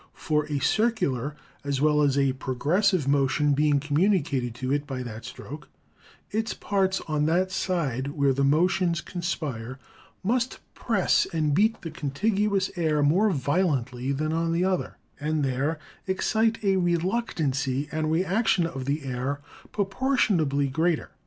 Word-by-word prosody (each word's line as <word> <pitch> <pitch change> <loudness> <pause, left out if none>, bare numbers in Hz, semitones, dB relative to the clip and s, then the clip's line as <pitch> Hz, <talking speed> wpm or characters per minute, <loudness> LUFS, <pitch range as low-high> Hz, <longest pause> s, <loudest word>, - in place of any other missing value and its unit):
For, 150 -1 0
a 150 -1 -1
circular 150 - 0 0.3
as 140 -1 -1
well 150 +1 +3
as 140 -2 +2
a 135 -1 +3
progressive 150 - +1
motion 140 +1 +2
being 145 0 +3
communi 160 +6 +2
cated 125 -4 -3
to 130 +2 -2
it 145 0 -1
by 130 -2 -4
that 110 -2 -8
stroke, 150 +2 -9 0.6
its 220 +1 -1
parts 190 -1 0
on 150 -1 +1
that 185 +3 +1
side, 150 -9 -1
where 140 -2 +1
the 140 +1 0
motions 170 +4 +2
conspire, 145 -10 -4 0.5
must 240 +5 0 0.2
press 205 -6 +1
and 155 -3 +1
beat 215 +8 +2
the 165 - -5
contiguous 195 +6 0
air 155 -4 +1
more 185 +9 +4
violently 140 - 0
than 155 +3 -1
on 165 0 0
the 175 +2 +1
other, 185 -1 -1 0.2
and 150 0 0
there 135 +5 -1 0.3
excite 220 +4 +1
a 195 -1 +3
reluct 180 +6 0
ancy 135 -2 -1
and 155 0 -1
reaction 185 +2 +2
of 135 -6 -5
the 140 +2 -1
air 135 +2 -3 0.3
proportionably 195 - +1
greater. 160 +4 0
155 Hz, 145 wpm, -26 LUFS, 140-185 Hz, 0.6 s, more